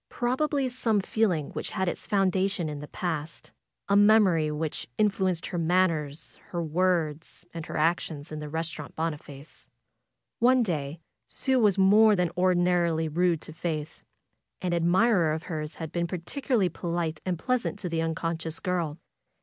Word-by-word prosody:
Prob 250 +3 -1
ably 285 -3 +1
some 235 -4 +1
feeling 190 -6 0
which - - -4
had 190 -3 -2
its - - -3
foundation 195 -2 +1
in 150 -1 -5
the 150 - -8
past; 160 -2 -4 0.4
a 200 - +3
memory 200 -7 +5
which 150 0 -3
influenced 190 -5 +1
her 175 - -3
manners, 160 -4 0
her 170 -1 -3
words 165 -1 -1
and 165 -2 -6
her - - -4
actions 155 -2 -1
in 155 - -5
the 150 0 -6
Restaurant 160 -1 -4
Boniface. 150 -2 -6 0.7
One 250 +1 +5
day 155 -5 -3 0.3
Sue 265 -1 0
was 205 -4 +3
more 210 +3 +6
than 180 -3 0
ordinarily 175 -3 +2
rude 170 0 +1
to 160 - -9
Faith. 160 -2 -4 0.6
An 180 -1 -2
admirer 175 0 +3
of 160 +1 -4
hers 155 -2 -5
had 160 -2 -6
been 170 0 -1
particularly 195 - -1
polite 170 -2 -3
and 180 -2 -1
pleasant 245 +4 -1
to 205 - -4
the 165 -1 -1
unconscious 165 0 -3
girl. 170 -4 -2
170 Hz, 155 wpm, -27 LUFS, 160-195 Hz, 0.7 s, more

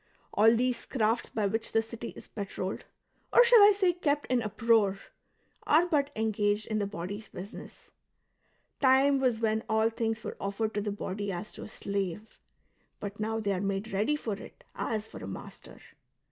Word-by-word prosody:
All 225 +2 +6
these 250 +1 0
crafts 225 -2 0
by 215 -2 -1
which 225 +3 -1
the 225 - +4
city 230 +1 -7
is - - -10
patrolled 195 -2 -5 0.2
— - - -37
or 485 - +8
shall 475 -1 +8
I 410 +1 +9
say 385 -3 +2
kept 295 -4 0
in 250 -2 +3
uproar 220 -2 +2 0.3
— - - -29
are 330 +3 +6
but 295 -5 +1
engaged 210 -1 0
in 215 -1 -1
the 205 - -1
body's 200 +2 -6
business; 190 +3 -10 0.9
time 270 +1 +5
was 250 -4 +1
when 220 -1 +1
all 220 +1 +3
things 225 -1 -2
were - - -6
otfei'ed 215 +3 -2
to 210 - -1
the 205 0 -2
body 200 0 -4
as 180 +3 -5
to - - -11
a - - -7
slave, 200 0 -4 0.6
but 205 0 -6
now 220 +1 -1
they 205 -2 -1
are 185 - -2
made 200 +2 -2
ready 210 +10 +2
for 230 -7 -3
it 200 - -10
as 215 -1 -2
for - - -10
a - - -6
master. - - -9
220 Hz, 190 wpm, -30 LUFS, 205-240 Hz, 0.9 s, I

